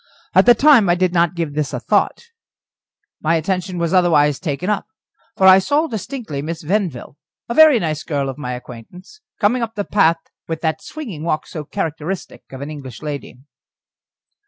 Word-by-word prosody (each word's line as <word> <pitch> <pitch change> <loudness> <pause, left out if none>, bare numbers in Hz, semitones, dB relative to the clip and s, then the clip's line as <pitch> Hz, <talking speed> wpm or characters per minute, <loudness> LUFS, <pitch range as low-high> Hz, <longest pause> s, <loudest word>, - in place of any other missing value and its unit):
At - - +5
the 240 - +8
time 260 -7 +5
I 175 - +4
did 180 0 0
not 170 0 +2
give 165 -4 -3
this 150 -1 -2
a - - -2
thought; - - 0 1.0
my 160 +2 +2
attention 180 +2 -2
was 170 +1 -1
otherwise 150 -6 +3
taken 165 0 -3
up. 210 -1 -1 0.5
For 190 - +3
I 190 0 +9
saw 290 +10 +1
distinctly 225 - -5
Miss 160 +2 -5
Venville, 165 - -2 0.3
a 235 - -3
very 310 -1 +7
nice 155 -6 -2
girl 140 -3 -2
of 135 - -4
my 125 -3 -4
acquaintance, 125 - -11 0.2
coming 240 +4 +2
up 225 -1 -4
the 205 -1 -2
path 165 -5 +3 0.3
with 165 -1 -4
that 160 +3 -1
swinging 215 - -8
walk 160 -2 -1
so 155 -4 -7
characteristic 165 +1 -4
of 130 0 -8
an 145 +2 -6
English 135 -6 -9
young - - -9
lady. 140 -3 -7
170 Hz, 180 wpm, -19 LUFS, 150-205 Hz, 1.0 s, I